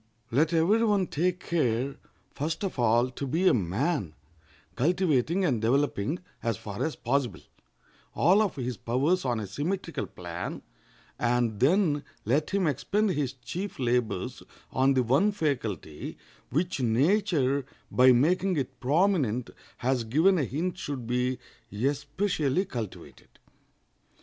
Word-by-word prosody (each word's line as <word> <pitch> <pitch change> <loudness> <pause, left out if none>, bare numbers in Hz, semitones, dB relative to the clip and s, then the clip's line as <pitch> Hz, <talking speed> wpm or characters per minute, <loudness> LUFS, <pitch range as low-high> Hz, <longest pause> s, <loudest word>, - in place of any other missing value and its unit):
Let 150 +7 +3
every 175 +8 +3
one 205 -4 +3
take 180 +3 -1
care, 135 -4 0 0.4
first 160 +5 -3
of 190 -9 -3
all, 120 +2 +3
to 140 +2 -5
be 170 +8 +2
a - - +6
man, 100 - -1 0.6
cultivating 170 +2 +2
and 125 -9 +1
developing, 135 - +1 0.2
as 115 -3 -1
far 105 -1 -5
as 160 - -2
possible, 125 -3 -1 0.7
all 185 +7 +5
of 205 -4 0
his 125 -3 -3
powers 140 - +1
on 120 -3 0
a 105 - -4
symmetrical 150 - -3
plan; - - -6 0.6
and 120 -3 +1
then 150 0 +3 0.2
let 140 +8 +1
him 200 -2 +1
expend 195 - +1
his 140 -5 -1
chief 150 +11 -6
labors 125 -2 -1 0.3
on 135 +1 +3
the 130 - +3
one 140 - +3
faculty, 115 - -3 0.3
which 165 +4 -1
nature, 140 - +2 0.3
by 130 +1 +6
making 175 +8 +2
it 130 -2 -3
prominent, 140 - +1 0.3
has 125 -1 0
given 160 +11 +3
a 145 - +1
hint 170 +8 -3
should 135 -5 -4
be 125 +2 0 0.4
especially 145 - 0
cultivated. 115 - -7
140 Hz, 130 wpm, -28 LUFS, 125-175 Hz, 0.7 s, a